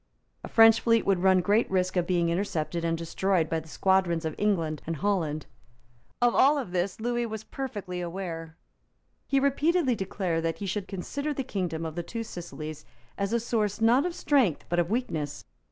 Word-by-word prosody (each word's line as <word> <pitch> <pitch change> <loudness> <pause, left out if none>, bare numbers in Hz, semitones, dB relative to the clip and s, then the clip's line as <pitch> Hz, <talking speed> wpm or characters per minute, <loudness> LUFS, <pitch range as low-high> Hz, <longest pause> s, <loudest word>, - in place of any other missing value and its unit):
A - - -5
French 225 0 +7
fleet 230 -1 +3
would 195 -2 +2
run 190 -1 +5
great 210 +5 +2
risk 185 -1 0
of 175 -1 +1
being 175 -2 +2
intercepted 170 -2 -2
and 165 0 0
destroyed 170 +1 0
by 165 - -1
the 160 - -13
squadrons 175 -1 +1
of 160 - -2
England 165 -8 0
and 165 - -1
Holland. 160 -5 -1 0.8
Of 240 - +4
all 280 -1 +4
this 180 +2 -2
Lewis 240 +1 -1
was 220 0 -5
perfectly 205 -9 -5
aware. 170 -2 -5 0.7
He 275 - +3
repeatedly 280 +1 +2
declared 190 -5 -2
that 165 0 -1
he 205 - -5
should 195 0 -3
consider 285 +10 -4
the 270 - -2
kingdom 175 - -3
of 160 - -4
the 175 - -3
Two 230 +7 -5
Sicilies 155 -6 -7 0.3
as 200 +1 -2
a 235 - +2
source, 220 -3 -1
not 240 +8 +4
of 345 - -5
strength, 255 - +2
but 175 +1 +1
of 170 0 +1
weakness. 155 - -2
190 Hz, 185 wpm, -28 LUFS, 170-230 Hz, 0.8 s, French